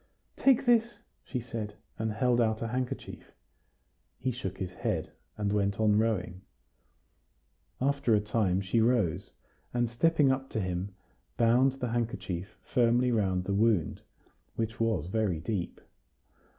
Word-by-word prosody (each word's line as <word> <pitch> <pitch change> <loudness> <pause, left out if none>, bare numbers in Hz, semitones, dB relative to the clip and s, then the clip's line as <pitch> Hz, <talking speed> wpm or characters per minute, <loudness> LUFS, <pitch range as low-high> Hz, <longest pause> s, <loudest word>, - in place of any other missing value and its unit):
"Take 270 -1 +4
this," 235 -1 +3 0.3
she 125 - -4
said, 110 -3 -5 0.2
and 110 0 -1
held 120 +3 +2
out 110 -1 +1
her 115 - -1
handkerchief. 125 +1 -5 0.8
He 130 - -1
shook 95 -6 -5
his 95 -1 -4
head, - - -2 0.3
and 105 -1 -1
went 100 -1 0
on 105 -1 +4
rowing. 100 -5 0 1.4
After 140 -3 +2
a - - +4
time 105 -3 +1
she 100 +4 +1
rose, 110 -9 +1 0.5
and, 120 0 +2
stepping 145 +4 +3
up 135 0 -2
to - - -2
him, 95 0 -3 0.4
bound 120 +3 +4
the 125 -2 -4
handkerchief 100 -6 -3
firmly 125 0 +2
round 95 -5 +1
the 100 - -2
wound, 105 -5 +2 0.5
which 115 0 -3
was 110 -9 +1
very 95 -3 0
deep. 90 +1 -3
110 Hz, 135 wpm, -30 LUFS, 100-125 Hz, 1.4 s, Take